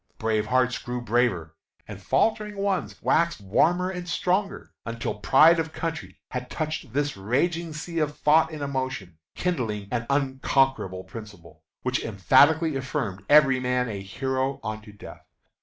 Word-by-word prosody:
Brave 110 Hz, -1 st, 0 dB
hearts 125 Hz, +1 st, +1 dB
grew 125 Hz, 0 st, -4 dB
braver, 115 Hz, -9 st, 0 dB, 0.3 s
and -, -, -9 dB
faltering 215 Hz, -2 st, 0 dB
ones 195 Hz, -2 st, -2 dB
waxed 170 Hz, -3 st, +2 dB
warmer 175 Hz, -, +2 dB
and 180 Hz, -1 st, -6 dB
stronger, 195 Hz, +5 st, -1 dB
until 115 Hz, -2 st, -4 dB
pride 155 Hz, +9 st, +6 dB
of 160 Hz, -1 st, -3 dB
country 165 Hz, 0 st, -5 dB
had 125 Hz, 0 st, -5 dB
touched 155 Hz, -5 st, -4 dB
this 145 Hz, +1 st, 0 dB
raging 160 Hz, -, -1 dB
sea 165 Hz, +2 st, -4 dB
of 150 Hz, -1 st, -1 dB
thought 160 Hz, +2 st, +4 dB
and 155 Hz, -2 st, -6 dB
emotion, 130 Hz, -, -4 dB, 0.2 s
kindling 115 Hz, -, -2 dB
an 115 Hz, -1 st, -2 dB
unconquerable 135 Hz, -7 st, +1 dB
principle, 100 Hz, -9 st, -12 dB, 0.2 s
which 125 Hz, 0 st, -1 dB
emphatically 145 Hz, -, +4 dB
affirmed 130 Hz, -8 st, -3 dB
every 145 Hz, -3 st, +6 dB
man 125 Hz, -1 st, 0 dB
a 100 Hz, -3 st, -5 dB
hero 130 Hz, +6 st, -2 dB
unto 110 Hz, -1 st, -6 dB
death. 100 Hz, -, -12 dB
130 Hz, 140 wpm, -25 LUFS, 110-160 Hz, 0.3 s, pride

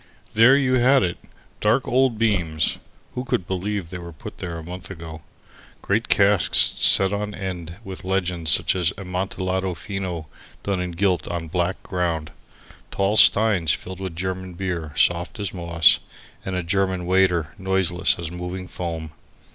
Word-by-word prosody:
There 115 Hz, +5 st, +6 dB
you 130 Hz, -2 st, +2 dB
had 130 Hz, +1 st, +5 dB
it; 90 Hz, -2 st, -2 dB, 0.4 s
dark 115 Hz, +5 st, +2 dB
old 130 Hz, -2 st, +2 dB
beams 90 Hz, -9 st, 0 dB, 0.3 s
(who 125 Hz, -, -3 dB
could 110 Hz, -8 st, -1 dB
believe 95 Hz, -1 st, -3 dB
they 90 Hz, -, -5 dB
were 85 Hz, -1 st, -8 dB
put 80 Hz, -, -10 dB
there 85 Hz, -2 st, -5 dB
a 80 Hz, -, -8 dB
month 90 Hz, +2 st, -8 dB
ago?), 80 Hz, -4 st, -8 dB, 0.6 s
great 110 Hz, +3 st, 0 dB
casks 100 Hz, -2 st, +3 dB
set 95 Hz, +1 st, +4 dB
on 105 Hz, 0 st, -3 dB
end 90 Hz, -4 st, -5 dB
with 95 Hz, -3 st, -8 dB
legends 90 Hz, -3 st, -1 dB
such -, -, +2 dB
as 90 Hz, -2 st, +1 dB
Amontillado 95 Hz, 0 st, -2 dB
Fino 95 Hz, -3 st, -5 dB, 0.4 s
done 100 Hz, -2 st, -1 dB
in 90 Hz, -1 st, -4 dB
gilt 90 Hz, -2 st, 0 dB
on 85 Hz, -1 st, -3 dB
a -, -, -8 dB
black 90 Hz, +2 st, -1 dB
ground, 85 Hz, -4 st, -2 dB, 0.6 s
tall 100 Hz, +2 st, 0 dB
steins 100 Hz, -8 st, +5 dB
filled 95 Hz, 0 st, -9 dB
with 95 Hz, -3 st, -5 dB
German 95 Hz, 0 st, -4 dB
beer 85 Hz, -4 st, -3 dB
soft 85 Hz, +6 st, +1 dB
as 100 Hz, -3 st, -3 dB
moss, 85 Hz, -3 st, +4 dB, 0.4 s
and 95 Hz, -, -4 dB
a 90 Hz, -, -1 dB
German 95 Hz, 0 st, 0 dB
waiter 90 Hz, -3 st, +2 dB
noiseless 95 Hz, -2 st, +2 dB
as 85 Hz, -2 st, -5 dB
moving 90 Hz, +1 st, -6 dB
foam. 80 Hz, -4 st, -5 dB
95 Hz, 160 wpm, -23 LUFS, 85-100 Hz, 0.6 s, There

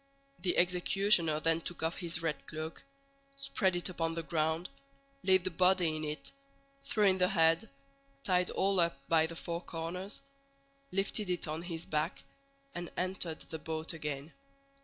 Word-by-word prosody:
The 175 Hz, 0 st, 0 dB
executioner 180 Hz, -2 st, +4 dB
then 165 Hz, +1 st, +2 dB
took 175 Hz, 0 st, -5 dB
off 160 Hz, +1 st, 0 dB
his 170 Hz, -2 st, -2 dB
red 160 Hz, -2 st, -2 dB
cloak, 155 Hz, +1 st, -5 dB, 0.6 s
spread 195 Hz, -9 st, +1 dB
it 175 Hz, -, -1 dB
upon 165 Hz, -3 st, -1 dB
the 165 Hz, -, -2 dB
ground, 160 Hz, +2 st, 0 dB, 0.5 s
laid 185 Hz, -1 st, +4 dB
the 185 Hz, -, -1 dB
body 180 Hz, -2 st, +4 dB
in 155 Hz, -, -4 dB
it, 150 Hz, 0 st, -5 dB, 0.5 s
threw 215 Hz, -, +1 dB
in 190 Hz, -2 st, +5 dB
the 180 Hz, -, +5 dB
head, 165 Hz, +2 st, +3 dB, 0.5 s
tied 180 Hz, -1 st, +2 dB
all 195 Hz, -1 st, +2 dB
up 170 Hz, -4 st, +3 dB
by 160 Hz, -1 st, +4 dB
the 165 Hz, -, -7 dB
four 170 Hz, 0 st, -3 dB
corners, 175 Hz, +4 st, -5 dB, 0.7 s
lifted 195 Hz, +1 st, 0 dB
it 180 Hz, -2 st, -1 dB
on 155 Hz, +2 st, -3 dB
his 170 Hz, -2 st, -3 dB
back, 150 Hz, 0 st, -1 dB, 0.5 s
and 175 Hz, -1 st, -5 dB
entered 180 Hz, -3 st, 0 dB
the 160 Hz, -, -5 dB
boat 160 Hz, +2 st, -3 dB
again. 150 Hz, -1 st, -4 dB
170 Hz, 160 wpm, -33 LUFS, 160-185 Hz, 0.7 s, in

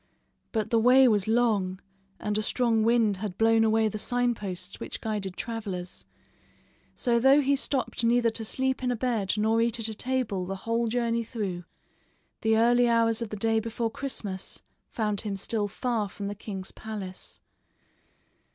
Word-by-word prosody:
But 220 Hz, -3 st, -2 dB
the 230 Hz, -, +4 dB
way 255 Hz, +3 st, +6 dB
was 210 Hz, -4 st, +2 dB
long 215 Hz, -5 st, +1 dB, 0.4 s
and 210 Hz, -1 st, -2 dB
a 215 Hz, -, +1 dB
strong 230 Hz, 0 st, +1 dB
wind 225 Hz, -3 st, +3 dB
had 195 Hz, -2 st, -5 dB
blown 225 Hz, 0 st, +4 dB
away 220 Hz, 0 st, +3 dB
the 215 Hz, 0 st, -4 dB
sign 245 Hz, +1 st, +1 dB
posts 190 Hz, -3 st, -6 dB
which -, -, -6 dB
guided 205 Hz, -4 st, -3 dB
travelers, 200 Hz, -6 st, -5 dB, 0.9 s
so, 235 Hz, -1 st, +1 dB
though 270 Hz, +4 st, +6 dB
he 280 Hz, 0 st, +3 dB
stopped 270 Hz, -3 st, -1 dB
neither 235 Hz, 0 st, +3 dB
to 225 Hz, -, -1 dB
sleep 265 Hz, +4 st, -1 dB
in 250 Hz, -, 0 dB
a 245 Hz, -, +1 dB
bed 225 Hz, -5 st, 0 dB
or 220 Hz, +2 st, +2 dB
eat 235 Hz, 0 st, +1 dB
at 225 Hz, -, -2 dB
a -, -, -4 dB
table 215 Hz, -6 st, -2 dB
the 195 Hz, -, -3 dB
whole 230 Hz, +1 st, +1 dB
journey 235 Hz, 0 st, 0 dB
through, 200 Hz, -7 st, -4 dB, 0.8 s
the 220 Hz, 0 st, +3 dB
early 240 Hz, +1 st, +4 dB
hours 230 Hz, -1 st, +2 dB
of 230 Hz, -, -3 dB
the 215 Hz, -, -5 dB
day 225 Hz, +2 st, +2 dB
before 230 Hz, +1 st, -3 dB
Christmas 210 Hz, -8 st, -5 dB, 0.3 s
found 210 Hz, -3 st, 0 dB
him 210 Hz, -3 st, -3 dB
still 205 Hz, +2 st, -1 dB
far 220 Hz, -1 st, -2 dB
from 200 Hz, +1 st, -7 dB
the 200 Hz, -, -3 dB
king's 195 Hz, -2 st, -7 dB
palace. 205 Hz, -4 st, -8 dB
225 Hz, 170 wpm, -27 LUFS, 205-235 Hz, 0.9 s, way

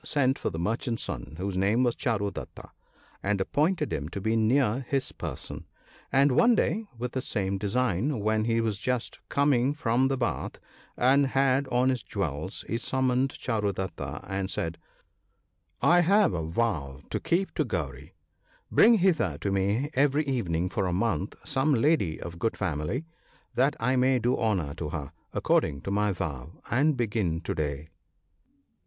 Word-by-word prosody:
sent 135 Hz, -2 st, +1 dB
for -, -, -1 dB
the 80 Hz, -, -6 dB
merchant's 115 Hz, -, -1 dB
son -, -, -5 dB
(whose 95 Hz, +1 st, -3 dB
name 100 Hz, +6 st, +2 dB
was 120 Hz, -2 st, +1 dB
Charu 100 Hz, -6 st, -1 dB
datta), -, -, -9 dB, 0.5 s
and 100 Hz, 0 st, 0 dB
appointed 150 Hz, -, +1 dB
him 75 Hz, +1 st, -3 dB
to 100 Hz, -, -5 dB
be 110 Hz, +3 st, 0 dB
near 120 Hz, +2 st, +2 dB
his 135 Hz, -2 st, 0 dB
person; -, -, -6 dB, 0.4 s
and 140 Hz, +1 st, +4 dB
one 235 Hz, -, +5 dB
day, 220 Hz, +1 st, 0 dB
with 125 Hz, +1 st, -3 dB
the 130 Hz, -, -2 dB
same 100 Hz, -5 st, -2 dB
design, 120 Hz, -, 0 dB
when 110 Hz, +1 st, +1 dB
he 115 Hz, 0 st, +2 dB
was 110 Hz, -3 st, -1 dB
just 125 Hz, 0 st, -2 dB
come 140 Hz, -2 st, +3 dB
from 130 Hz, -3 st, +2 dB
the 135 Hz, 0 st, 0 dB
bath, 120 Hz, -2 st, -2 dB, 0.4 s
and 135 Hz, +3 st, +4 dB
had 135 Hz, +1 st, +2 dB
on 125 Hz, +1 st, +2 dB
his 130 Hz, -3 st, 0 dB
jewels, 90 Hz, -, -4 dB
he 115 Hz, -, -1 dB
summoned 130 Hz, +1 st, 0 dB
Charudatta, 100 Hz, -5 st, -3 dB
and 95 Hz, 0 st, -2 dB
said, 85 Hz, -3 st, -3 dB, 0.3 s
— -, -, -46 dB
" -, -, -43 dB
I 175 Hz, +1 st, +6 dB
have 195 Hz, +2 st, +4 dB
a 80 Hz, -2 st, -2 dB
vow 80 Hz, -, -1 dB
to -, -, -1 dB
keep 185 Hz, +3 st, 0 dB
to 155 Hz, -, +1 dB
Gauri 75 Hz, -, -5 dB, 0.2 s
(") 75 Hz, -, -43 dB
— -, -, -41 dB
bring 230 Hz, +2 st, +7 dB
hither 165 Hz, -, +2 dB
to 100 Hz, -, -1 dB
me 100 Hz, +9 st, 0 dB
every 145 Hz, +2 st, +2 dB
evening 90 Hz, -, 0 dB
for 95 Hz, 0 st, -1 dB
a 90 Hz, -, -1 dB
month 100 Hz, 0 st, -1 dB
some 140 Hz, +2 st, +2 dB
lady 115 Hz, -, +2 dB
of 85 Hz, -1 st, -7 dB
good 115 Hz, +4 st, -1 dB
family, 95 Hz, -, -2 dB, 0.5 s
that 135 Hz, +4 st, +2 dB
I 125 Hz, +3 st, +1 dB
may 130 Hz, +1 st, +4 dB
do 120 Hz, +1 st, +1 dB
honour 95 Hz, -10 st, 0 dB
to 75 Hz, -2 st, -4 dB
her, 75 Hz, -3 st, -5 dB, 0.2 s
according 70 Hz, -, +1 dB
to 95 Hz, -, -4 dB
my 105 Hz, +1 st, +2 dB
vow; 80 Hz, -5 st, -5 dB, 0.2 s
and 140 Hz, +4 st, +3 dB
begin 105 Hz, -8 st, 0 dB
to -, -, -3 dB
day." 75 Hz, 0 st, -3 dB
115 Hz, 175 wpm, -28 LUFS, 95-135 Hz, 0.5 s, bring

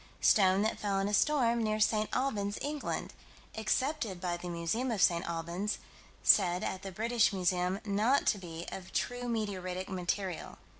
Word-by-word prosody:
Stone 195 Hz, -1 st, +5 dB
that 220 Hz, -, -1 dB
fell 200 Hz, -2 st, 0 dB
in 195 Hz, +1 st, +1 dB
a 205 Hz, -, -2 dB
storm, 235 Hz, -1 st, +3 dB
near 215 Hz, -1 st, 0 dB
St. 215 Hz, 0 st, +2 dB
Albans, 210 Hz, -6 st, -1 dB
England: 295 Hz, 0 st, -3 dB, 0.4 s
accepted 230 Hz, -, -1 dB
by 175 Hz, -1 st, -2 dB
the 175 Hz, +1 st, -6 dB
Museum 170 Hz, +10 st, -1 dB
of 225 Hz, -4 st, -1 dB
St. 170 Hz, -2 st, +4 dB
Albans; 170 Hz, +5 st, -2 dB, 0.5 s
said, 180 Hz, -3 st, +5 dB
at 190 Hz, -, -3 dB
the 195 Hz, -, -6 dB
British 225 Hz, +3 st, +2 dB
Museum, 180 Hz, 0 st, 0 dB
not 215 Hz, +7 st, +2 dB
to 205 Hz, -, +2 dB
be 170 Hz, -2 st, -7 dB
of 185 Hz, -1 st, -8 dB
"true 245 Hz, 0 st, -2 dB
meteoritic 190 Hz, -5 st, -3 dB
material." 185 Hz, 0 st, -3 dB
200 Hz, 160 wpm, -32 LUFS, 180-225 Hz, 0.5 s, Stone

